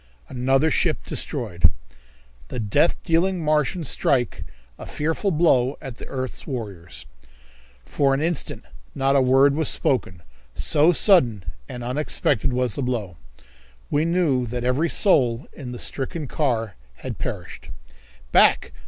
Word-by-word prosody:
Another 135 +5 +1
Ship 165 -3 +1
Destroyed. 100 - 0 0.8
The 125 - -5
Death 110 +10 +2
Dealing 175 +1 +1
Martians 150 +1 0
Strike 125 -3 0 0.3
a - - -8
Fearful 160 +7 -1
Blow 145 -6 +2
at 130 -5 -8
the - - -9
Earth's 130 -2 -5
Warriors. 95 - -7 0.8
For 135 -1 +1
an - - -2
instant 165 0 -2 0.3
not 135 0 +1
a 135 - +5
word 135 +2 +4
was 155 0 0
spoken, 95 - -1 0.3
so 155 +2 +3
sudden 150 - +3 0.3
and 125 -1 -6
unexpected 130 -1 0
was 125 -2 0
the - - -2
blow. 110 -10 -3 0.7
We 145 +1 +2
knew 165 -8 +1
that 120 +1 -4
every 130 +7 +1
soul 130 - +3
in 130 -5 -8
the 120 - -6
stricken 145 +5 -4
car 115 - -1 0.2
had - - -7
perished. - - -6 0.6
"Back! - - +4
135 Hz, 135 wpm, -23 LUFS, 120-155 Hz, 0.8 s, a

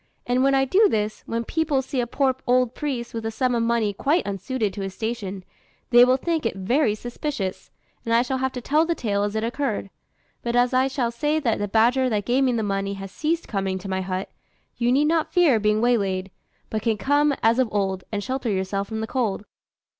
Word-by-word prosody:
And 245 +1 +1
when 275 +1 +4
I 270 0 +3
do 400 +10 +4
this, 215 0 -1
when 230 0 -2
people 305 -3 0
see 260 -1 -2
a 240 - -2
poor 265 +1 +1
old 250 -1 +3
priest 255 -5 -4
with 225 -1 -4
a 225 - -1
sum 250 +3 0
of 235 - +1
money 230 -3 +1
quite 295 - +1
unsuited 205 +2 -2
to 205 - -6
his 195 -1 -5
station, 210 -4 -4 0.5
they 240 0 +8
will 255 +1 +4
think 325 +3 -1
it 230 - -1
very 215 +4 +1
suspicious, 240 -4 -4 0.3
and 230 - -3
I 230 +1 +4
shall 260 +1 -2
have 265 0 0
to 250 - -5
tell 300 +6 +2
the 335 0 0
tale 205 -7 -1
as 205 +1 -1
it 220 - -1
occurred; 230 -4 -2 0.5
but 235 0 -2
as 245 +1 +3
I 260 +1 +3
shall 255 -3 -1
say 295 +6 0
that 235 -6 0
the 205 - -1
badger 240 +5 +3
that 210 -3 -1
gave 255 +3 +2
me 255 - +2
the 225 -2 0
money 195 0 -2
has 195 -1 -8
ceased 325 +6 -1
coming 195 -2 -2
to 190 +1 -8
my 190 0 -1
hut, 185 0 -4 0.4
you 240 0 +1
need 280 +4 +3
not 320 0 +1
fear 330 -11 +4
being 210 +1 +2
waylaid, 195 -6 +1 0.4
but 215 - -1
can 225 -1 0
come, 285 +5 +2
as 230 +3 +4
of 255 -3 +2
old, 190 -2 -1
and 205 -1 -2
shelter 260 -1 -2
yourself 195 0 -1
from 220 -1 -4
the - - -1
cold." 220 -4 -2
235 Hz, 230 wpm, -24 LUFS, 205-265 Hz, 0.5 s, they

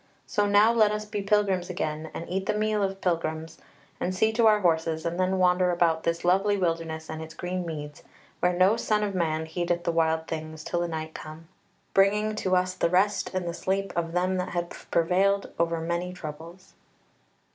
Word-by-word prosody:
So 205 -1 +1
now 205 +3 +5
let 220 -2 +5
us 210 0 -3
be 210 -1 -4
pilgrims 195 -3 +1
again, 155 -3 -3
and 165 - -5
eat 190 +2 -3
the 215 - +1
meal 215 0 +1
of 195 0 -2
pilgrims, 160 -2 -2 0.4
and 185 +1 -2
see 220 +4 +3
to 230 0 +4
our 210 -1 +5
horses, 160 -2 +1
and 170 +1 -2
then 185 +1 +1
wander 180 0 +3
about 170 -2 +2
this 170 +1 -1
lovely 195 +3 +3
wilderness 165 -3 -2
and 160 0 -6
its 160 0 -9
green 180 0 -3
meads, 150 -2 -6 0.4
where 180 - +3
no 185 +5 +3
son 215 -2 +1
of 205 -1 -2
man 160 -3 0
heedeth 175 +1 -2
the 170 - +1
wild 160 -1 +1
things, 155 -1 -6
till 175 - -2
the 175 - 0
night 160 -1 -5
come, 155 +1 -9 0.5
bringing 210 +2 +3
to 185 -3 +1
us 185 0 +1
the 175 - 0
rest 190 +4 +2
and 185 -2 -1
the 170 - -2
sleep 195 +3 -2
of 165 -1 -2
them 185 +1 +1
that 180 0 -2
have 175 -1 -2 0.2
prevailed 195 +4 +2
over 170 0 +1
many 170 +2 -2
troubles." 165 +2 -9
180 Hz, 200 wpm, -27 LUFS, 165-195 Hz, 0.5 s, now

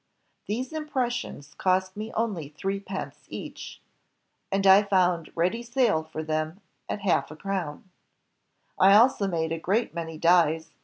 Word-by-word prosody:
These 250 +7 -3
impressions 255 - -3
cost 185 0 +1
me 215 +2 -5
only 200 -10 -2
three 195 +6 -3
pence 195 -1 -7
each..., - - -8 0.7
and 195 0 0
I 195 +1 +8
foimd 180 -5 +1
ready 180 +8 0
sale 235 -7 +1
for 155 0 -6
them 155 +3 -2 0.3
at 205 - -3
a - - -13
half 195 - +2
crown. 190 -3 -4 0.9
"I 195 +2 +7
also 230 -2 +5
made 165 -3 -1
a 165 - -2
great 215 +8 0
many 165 -2 -5
dies 165 -1 +3
190 Hz, 145 wpm, -26 LUFS, 165-215 Hz, 0.9 s, I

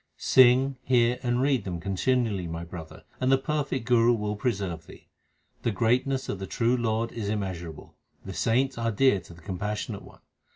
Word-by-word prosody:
Sing, 130 +1 +5
hear, 125 -1 +2
and 120 0 0
read 135 -3 +2
them 90 -3 -4
continually, 100 0 0
my 85 +1 -5
brother, 85 -2 -10 0.2
and 130 +1 +1
the 135 - +6
perfect 135 -2 -2
Guru 120 -1 +4
will 105 -1 -2
preserve 95 -8 -3
thee. - - -15 0.5
The - - 0
greatness 125 +5 +1
of 100 - -4
the 95 - -5
true 120 +1 +1
Lord 115 -1 -1
is 105 -3 -4
immeasurable; 90 -6 -5 0.3
the 95 - -6
saints 125 +5 +1
are 115 0 0
dear 115 -1 +3
to 85 -1 -14
the 85 - -16
Compassionate 105 +3 -4
One. - - -16
115 Hz, 175 wpm, -27 LUFS, 95-125 Hz, 0.5 s, the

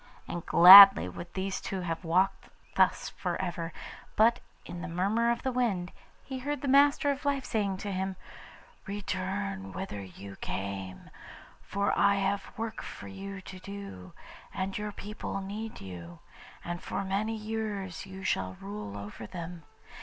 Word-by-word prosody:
And 175 - -5
gladly 195 - +11
would 170 - -8
these 190 0 -2
two 190 -1 -4
have 165 0 -4
walked 185 +3 +1 0.3
thus - - +2
for - - -4
ever, 175 -2 -3 0.4
but 230 +2 +4 0.3
in 175 - -7
the 180 - -5
murmur 200 +7 +1
of 235 - -1
the 260 - 0
wind 210 -8 -1 0.3
he 265 -1 -6
heard 285 +1 -3
the 285 - -3
Master 285 +1 +5
of 280 0 -5
Life 280 -2 0
saying 200 -4 -1
to 200 +1 -5
him, 190 0 -2 0.7
'Return 195 0 -3
whither 190 - -5
you 95 +1 -11
came, 95 -1 -5 0.5
for 200 +1 -1
I 200 0 +4
have 195 0 -1
work 225 -1 -4
for - - -9
you 195 0 -7
to 185 0 -10
do, 185 - -9 0.4
and 190 +1 -3
your 210 0 -3
people 205 0 -6
need 210 +3 -6
you, 85 -3 -9 0.5
and 175 +1 -4
for 195 - -3
many 205 +4 -1
years 210 -4 -4
you 190 0 -9
shall 95 - -1
rule 100 0 -7
over 105 +2 -8
them. 170 +2 -7
195 Hz, 155 wpm, -29 LUFS, 170-210 Hz, 0.7 s, gladly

